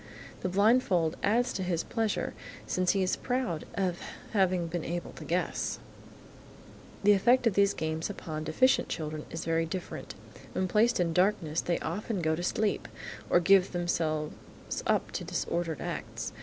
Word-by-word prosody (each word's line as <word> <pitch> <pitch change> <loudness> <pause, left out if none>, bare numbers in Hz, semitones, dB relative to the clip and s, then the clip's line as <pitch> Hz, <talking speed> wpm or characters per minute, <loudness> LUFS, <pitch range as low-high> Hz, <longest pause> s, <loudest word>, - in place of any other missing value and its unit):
The 185 - -2
blindfold 195 -5 +3
adds 240 +4 +2
to - - -3
his 175 -3 0
pleasure, 225 -2 -1 0.3
since 185 -1 +1
he 195 -1 +2
is 185 - +1
proud 250 -11 -2
of 185 -3 0 0.3
having 185 -4 +2
been 165 0 -3
able 175 +1 -4
to - - -10
guess. - - -1 1.3
The 205 - +7
effect 240 +6 +4
of 230 - +4
these 200 +1 +3
games 160 +2 -2
upon 155 -6 -5
deficient 255 +12 +3
children 155 -1 -4
is 165 - -5
very 165 0 +1
different. 180 +1 -6 0.4
When 185 - 0
placed 220 +4 +3
in 170 -2 +1
darkness, 180 -4 +2
they 175 - 0
often 195 +2 -3
go 160 0 +2
to 170 - -4
sleep, 210 +4 0 0.4
or - - +5
give 190 +1 +4
themselves 160 -3 0 0.6
up - - +1
to - - -3
disordered 170 -2 -2
acts. - - -4
180 Hz, 155 wpm, -30 LUFS, 165-200 Hz, 1.3 s, The